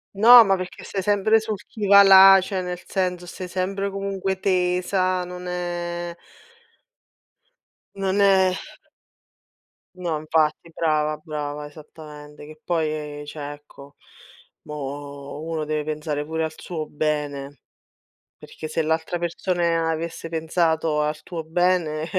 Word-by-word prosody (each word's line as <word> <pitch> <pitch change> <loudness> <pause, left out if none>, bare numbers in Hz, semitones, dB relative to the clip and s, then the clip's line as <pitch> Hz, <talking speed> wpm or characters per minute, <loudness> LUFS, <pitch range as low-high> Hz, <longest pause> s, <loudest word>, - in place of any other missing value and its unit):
No, 235 +3 +9
ma 195 -2 +2
perché 185 0 -7
stai 195 - -4
sempre 205 +3 +3
sul 220 -1 -3
chi 210 -3 -5
va 200 0 +9
là, 195 0 +9
cioè 190 0 -3
nel 180 0 -5
senso 180 -2 -2
stai 180 +1 -7
sempre 195 +2 -2
comunque 195 -1 -3
tesa, 185 0 +1
non 180 0 -8
è 175 -1 -4 1.8
non 195 +1 0
è 190 -2 +4 1.4
No, 170 -4 -2
infatti, 155 +1 0
brava, 155 -1 0
brava, 150 -1 -5
esattamente. 150 -1 -12
Che 155 0 -14
poi, 165 -3 0 0.3
ehm, 145 - -8
cioè, 145 -1 -7
ecco, 145 -1 -14 0.7
mo' 145 0 -7
uno 160 -2 -3
deve 155 0 -2
pensare 150 -1 -3
pure 160 +1 -2
al 160 - -6
suo 155 -4 -6
bene, 145 -2 -3 0.8
perché 155 - -9
se 165 - 0
l'altra 160 +2 -1
persona 170 -1 0
avesse 165 +1 -4
pensato 160 -1 0
al 150 0 -2
tuo 165 -3 -6
bene 165 -2 0
165 Hz, 125 wpm, -23 LUFS, 155-185 Hz, 1.8 s, No